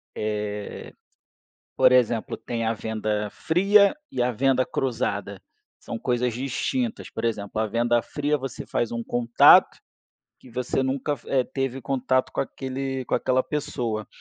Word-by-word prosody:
eh 105 -1 -4 0.8
por - - +5
exemplo, 120 -3 +2
tem 115 -1 -4
a 110 - +1
venda 110 -1 -2
fria 200 - +4 0.2
e - - -5
a 125 - +1
venda 130 +2 +2
cruzada. 100 -6 -2 0.4
São 115 - -6
coisas 125 -1 0
distintas, 180 - -2
por 110 - -5
exemplo, 110 -2 -2
a 110 - 0
venda 120 +2 +2
fria, 145 +3 -1
você 135 -3 -5
faz 120 - -1
um 115 0 -3
contato 120 0 +5 0.6
que - - -17
você 125 +2 -2
nunca 135 +2 -1
f 115 - -17
eh, 135 -2 +3
teve 135 0 -3
contato 130 +1 0
com - - -1
aquele 135 0 -4
com - - -1
aquela 130 0 +1
pessoa. 125 -9 -3
125 Hz, 150 wpm, -25 LUFS, 110-135 Hz, 0.8 s, por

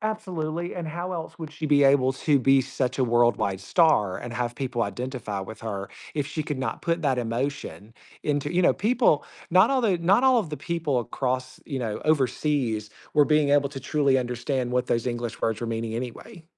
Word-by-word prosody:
Absolutely, 175 -6 -3
and 170 - -4
how 175 +3 -4
else 165 -2 -6
would 155 - -6
she 155 0 -4
be 145 -1 +4
able 135 -1 +4
to 140 +1 +2
be 135 +1 +4
such 135 0 -2
a 130 - +3
worldwide 115 -5 +2
star 105 - +3
and 120 - -7
have 120 0 -2
people 125 -3 -2
identify 115 -2 -4
with 110 +3 -8
her 100 -3 -4 0.3
if 145 -2 0
she 155 +2 -4
could 145 -3 -3
not 130 - -3
put 170 0 0
that 135 -3 +1
emotion 120 -2 -3 0.3
into 145 +1 -1
you 180 - +3
know, - - +5
people, 225 - +2 0.3
not 185 +8 +6
all 265 -2 +2
the 195 -7 +2
not 190 +8 +3
all 260 -2 +5
of 180 -8 -3
the 150 - -4
people 165 -7 -1
across, 130 +2 -3
you 135 -4 -3
know, 110 -3 -3
overseas 135 -7 0 0.2
were 150 - +5
being 150 -1 +3
able 145 -1 +4
to 135 -2 -7
truly 140 -1 +2
understand 125 +1 -2
what 125 0 0
those 115 -1 0
English 120 -2 -4
words 110 0 0
were 120 - -3
meaning 115 0 -3
anyway. 155 - -7
135 Hz, 205 wpm, -25 LUFS, 120-160 Hz, 0.3 s, not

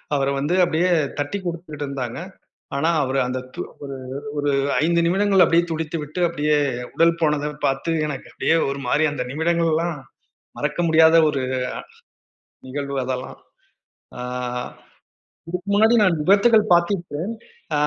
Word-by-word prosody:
அவர 135 -1 +1
வந்து 150 +6 0
அப்டியே 175 +2 +1 0.3
தட்டி 145 +8 -2
குடுத்துட்டு 165 -4 -5
இருந்தாங்க. 130 -3 -4 0.6
ஆனா, 155 +4 +1
அவரு 135 +1 0
அந்த 130 0 -2 0.2
து - - -4
அவரு 140 -1 -8 0.4
ஒரு 145 0 +1 0.3
5 170 +1 +2
நிமிடங்கள் 195 +1 +4
அப்டியே 170 +1 +3
துடித்துவிட்டு 155 0 -4
அப்டியே 150 -2 +1 0.4
உடல் 165 0 +3
போனதப் 150 -1 0
பாத்து 135 +5 0
எனக்கு 145 -3 -5
அப்டியே 165 - +1
ஒரு 140 0 -4
மாரி 150 +5 +2
அந்த 125 -4 -3
நிமிடங்களெல்லாம், 165 +1 0 0.6
மறக்க 150 +3 -2
முடியாத 160 +1 +6
ஒரு 140 -3 -1 0.2
அ, - - 0 1.1
நிகழ்வு 140 +1 -4
அதெல்லாம். 130 0 -4 0.8
ஆ, - - -8 1.3
இதுக்கு 180 +3 -5
முன்னாடி 220 +3 +5
நான் 175 -5 +3
விபத்துகள் 210 +4 +4
பாத்திருக்கேன். 175 0 0 0.5
ஆ, - - +2
160 Hz, 130 wpm, -22 LUFS, 145-170 Hz, 1.3 s, முடியாத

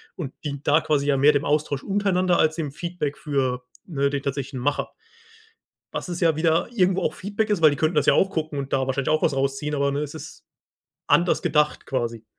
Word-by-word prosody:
und 145 -7 -6
dient 145 -2 -5
da 150 +2 +5
quasi 145 -2 0
ja 145 - +3
mehr 145 +3 +6
dem 145 -1 0
Austausch 145 -2 0
untereinander 190 -3 +1
als 155 0 +3
dem 155 -4 -3
Feedback 160 -2 -4
für, 130 -4 -1 0.2
ne, 140 -5 0
den 140 -1 -3
tatsächlichen 135 -1 -3
Macher. 145 +3 -1 1.0
Was - - -4
es 175 - -4
ja 165 -3 +3
wieder 160 +1 +2
irgendwo 190 -4 +2
auch - - 0
Feedback 205 +3 -3
ist, 205 -5 +1
weil 155 - +8
die 145 - -1
könnten 155 +3 0
das 150 -2 +3
ja - - +5
auch 195 - +3
gucken 155 -5 -3
und 135 0 -5
da 135 -1 +2
wahrscheinlich 135 +2 -1
auch 155 0 +2
was 150 - +1
rausziehen, 135 +2 -1
aber, 140 0 +1
ne, 140 - -1
es 150 -1 -5
ist 160 - -10 0.6
anders 175 0 +3
gedacht 150 -1 +1
quasi. 120 -4 -3
150 Hz, 220 wpm, -24 LUFS, 140-170 Hz, 1.0 s, weil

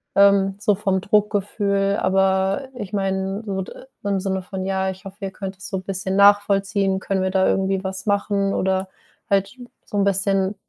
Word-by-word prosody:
ähm, 200 -1 +5
so 210 0 +2
vom 195 -2 0
Druckgefühl.“ 200 -1 +1
Aber 190 +5 +1
ich 205 -5 -7
meine, 195 +1 -1
so 195 -2 -2
d - - -10 0.3
im 200 -1 +1
Sinne 190 -1 -1
von: 190 0 -5
„Ja, 190 0 0
ich 190 +1 -12
hoffe, 195 0 -9
ihr 195 -1 -3
könnt 195 0 -7
es 185 - -8
so 190 - -2
'n 185 - -6
bisschen 190 0 -3
nachvollziehen, 200 -1 +3
können 190 -1 -1
wir 190 - 0
da 190 0 +3
irgendwie 195 0 0
was 190 0 -5
machen?“ 200 -1 +1
Oder 190 0 0 0.4
halt 200 +4 +1 0.3
so 205 - -5
'n 200 - +3
bisschen 195 0 +1
195 Hz, 185 wpm, -22 LUFS, 190-200 Hz, 0.4 s, ähm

